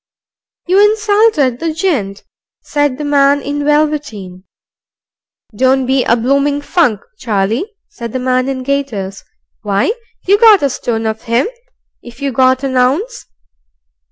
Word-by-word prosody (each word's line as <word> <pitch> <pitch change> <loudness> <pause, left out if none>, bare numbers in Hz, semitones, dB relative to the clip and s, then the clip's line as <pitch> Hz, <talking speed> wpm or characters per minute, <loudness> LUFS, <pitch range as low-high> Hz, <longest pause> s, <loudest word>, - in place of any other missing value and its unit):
"You 380 +3 +4
insulted 415 - +2
the 330 -1 -2
gent," 280 - -2 0.4
said 290 -3 -1
the 300 - -5
man 285 0 +3
in 285 +1 -4
velveteen. 290 -12 -1 1.1
"Don't 260 +3 +2
be 265 0 +1
a 230 - +2
bloomin' 280 +4 0
funk, 285 - +1 0.2
Charlie," 225 - -1 0.2
said 235 - -8
the 260 - -3
man 255 0 0
in 260 -1 -4
gaiters. 245 -9 -3 0.4
"Why, 205 - 0 0.3
you 405 +2 +3
got 435 -7 +6
a 280 - +1
stone 225 -2 -3
of 220 0 -3
him, 235 +4 +1 0.5
if 240 +1 -13
you 280 -1 -2
got 260 +2 +2
an 265 -1 -1
ounce." 290 - 0
270 Hz, 135 wpm, -14 LUFS, 235-300 Hz, 1.1 s, got